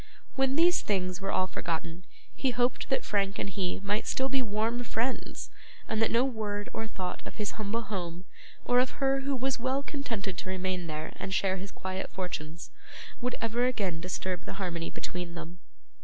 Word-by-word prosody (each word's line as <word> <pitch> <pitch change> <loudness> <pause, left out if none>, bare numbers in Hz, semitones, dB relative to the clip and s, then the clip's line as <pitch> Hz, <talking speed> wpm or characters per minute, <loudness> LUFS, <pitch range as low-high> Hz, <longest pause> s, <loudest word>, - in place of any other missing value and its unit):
When 270 0 +3
these 345 +3 +6
things 185 -2 0
were 195 - 0
all 185 - +4
forgotten, 170 -1 -3 0.3
he 270 - +2
hoped 245 0 +2
that 265 - +2
Frank 200 -1 +2
and - - 0
he 185 -1 -1
might 205 +2 +1
still 265 +1 +2
be 270 0 +3
warm 225 +2 +1
friends, 240 +2 -1 0.4
and 220 0 +1
that 225 - +5
no 235 +3 +5
word 210 -5 -2
or 225 - -2
thought 185 -4 -3
of - - -8
his 210 -1 -1
humble 220 +2 -1
home, 180 -4 -3 0.4
or 245 0 +6
of 255 0 +2
her 270 -1 +4
who 275 0 +1
was 260 0 +1
well 260 +3 +1
contented 225 - -2
to - - -4
remain 185 -2 -1
there 155 0 -3
and 190 - -1
share 195 -2 +3
his 195 +1 -5
quiet 190 0 -3
fortunes, 170 -3 -4 0.5
would 250 0 0
ever 235 +2 +3
again 190 -9 0
disturb 180 0 -2
the - - -4
harmony 175 -4 -2
between 175 -1 -4
them. 170 +1 -6
205 Hz, 185 wpm, -31 LUFS, 185-245 Hz, 0.5 s, these